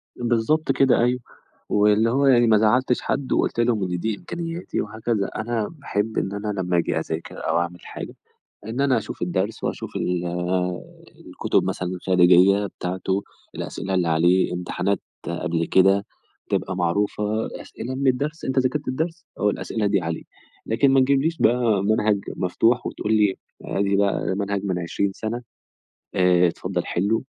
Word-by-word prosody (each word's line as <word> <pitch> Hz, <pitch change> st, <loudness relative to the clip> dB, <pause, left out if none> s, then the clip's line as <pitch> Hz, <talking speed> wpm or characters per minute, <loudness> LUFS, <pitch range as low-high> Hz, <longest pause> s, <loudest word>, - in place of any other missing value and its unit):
بالضبط 120 Hz, +6 st, +1 dB
كده 135 Hz, -2 st, +3 dB
أيوه، 125 Hz, +1 st, +2 dB, 0.5 s
واللي 105 Hz, +2 st, +4 dB
هو 140 Hz, +4 st, +2 dB
يعني 120 Hz, -3 st, +5 dB
ما 110 Hz, -1 st, +5 dB
زَعلتش 125 Hz, +4 st, +2 dB
حد 135 Hz, -1 st, -2 dB
وقُلت -, -, 0 dB
لهم 115 Hz, -3 st, +2 dB
إن 90 Hz, -1 st, -2 dB
دي 110 Hz, +3 st, -2 dB
إمكانياتي 170 Hz, -, -4 dB
وهكذا، 110 Hz, -1 st, -2 dB
أنا 110 Hz, -1 st, -1 dB
باحب 110 Hz, -8 st, -3 dB
إن 95 Hz, -, -1 dB
أنا 100 Hz, +1 st, -4 dB
لمّا 90 Hz, -1 st, 0 dB
أجي 85 Hz, -1 st, +1 dB
أذاكر 80 Hz, 0 st, -5 dB
أو 80 Hz, -, +2 dB
أعمل 85 Hz, 0 st, -3 dB
حاجة، -, -, -7 dB, 0.5 s
إن 115 Hz, +4 st, -3 dB
أنا 135 Hz, -3 st, +3 dB
أشوف -, -, -7 dB
الدرس، 95 Hz, +5 st, -2 dB
وأشوف -, -, -4 dB
ال 90 Hz, -1 st, -1 dB, 1.0 s
الكتب -, -, 0 dB
مثلًا 90 Hz, -, -2 dB
الخارجية 90 Hz, +2 st, +4 dB
بتاعتُه، 95 Hz, +1 st, -3 dB, 0.3 s
الأسئلة 95 Hz, 0 st, -4 dB
اللي 90 Hz, -2 st, +1 dB
عليه، 85 Hz, +4 st, +3 dB
امتحانات 90 Hz, +2 st, -1 dB, 0.3 s
قبل 85 Hz, 0 st, -1 dB
كده 95 Hz, +1 st, +4 dB, 0.5 s
تبقى 95 Hz, -, -1 dB
معروفة، 95 Hz, +4 st, 0 dB, 0.4 s
أسئلة 130 Hz, +3 st, -6 dB
من 135 Hz, +1 st, -1 dB
الدَّرس، 145 Hz, +5 st, 0 dB
أنت 130 Hz, 0 st, 0 dB
ذاكرت 130 Hz, +3 st, 0 dB
الدَّرس 165 Hz, +5 st, -3 dB, 0.2 s
أهو 105 Hz, -, +3 dB
الأسئلة 110 Hz, +1 st, -2 dB
دي 100 Hz, -1 st, +2 dB
عليه، 85 Hz, -1 st, -3 dB, 0.4 s
لكن 125 Hz, +5 st, +3 dB
ما 135 Hz, -, +5 dB
تجيبليش 140 Hz, +5 st, +2 dB
بقى 115 Hz, -4 st, +3 dB
منهج 105 Hz, 0 st, +2 dB, 0.2 s
مفتوح، 115 Hz, +7 st, +1 dB
وتقول 110 Hz, -, -2 dB
لي 105 Hz, -3 st, +3 dB, 0.3 s
أدي 100 Hz, 0 st, 0 dB
بقى 100 Hz, 0 st, +1 dB
ده -, -, 0 dB
منهج 100 Hz, 0 st, -2 dB
من 95 Hz, -3 st, -1 dB
20 95 Hz, +3 st, -1 dB
سنة، 115 Hz, +4 st, -4 dB, 0.7 s
آآ 90 Hz, -1 st, +4 dB
اتفضّل 85 Hz, -, -3 dB
حِلّه 100 Hz, +5 st, 0 dB
105 Hz, 155 wpm, -23 LUFS, 95-120 Hz, 1.0 s, يعني